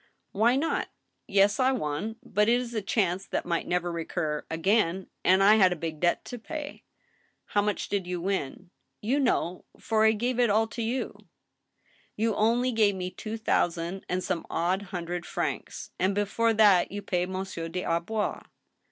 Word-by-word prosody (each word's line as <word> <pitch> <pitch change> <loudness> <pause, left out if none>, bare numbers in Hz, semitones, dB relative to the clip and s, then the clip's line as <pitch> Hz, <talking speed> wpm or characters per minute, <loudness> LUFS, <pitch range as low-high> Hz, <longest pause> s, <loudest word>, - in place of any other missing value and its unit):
" - - -48
Why 230 +5 +3
not? 310 +5 0 0.4
Yes, 200 +2 +3
I 260 0 +4
won. 210 - -2
But 210 +2 +1
it 240 +1 +4
is 240 -1 -5
a 220 - -1
chance 195 -2 0
that - - -2
might 170 -1 -1
never 175 0 0
recur 160 -2 -3
again, 190 +2 +1
and 190 +1 +5
I 210 +2 +7
had 190 -3 +5
a - - 0
big 160 -2 -5
debt 175 +1 +1
to 245 - -7
pay 295 +5 -7 0.2
— - - -38
" - - -50
How 205 - +4
much 210 0 -1
did 195 -3 -2
you 180 -1 -2
win? 185 -1 -3
" - - -48
" - - -51
You 280 +3 +3
know, 185 -9 0
for 220 -1 +1
I 220 0 +6
gave 240 +3 -1
it 240 -2 +4
all 215 +2 +3
to 230 - -5
you." 235 +3 0
AN - - -20
ILLUMINATION. - - -21 0.8
X63 - - -38
"You 220 0 +1
only 235 +4 +2
gave 215 -4 +3
me 185 -1 -4
two 220 +3 -6
thousand 175 -4 -1
and 180 0 -1
some 180 -4 -2
odd 180 +4 0
hundred 175 -3 -5
francs, - - -4
and 190 +2 +1
before 220 +3 +1
that 205 -5 +5
you 205 +1 -5
paid 180 -1 -1
Monsieur 185 -3 -4
des 180 +2 -3
Arbois." 175 +6 -1
195 Hz, 205 wpm, -28 LUFS, 175-225 Hz, 0.8 s, I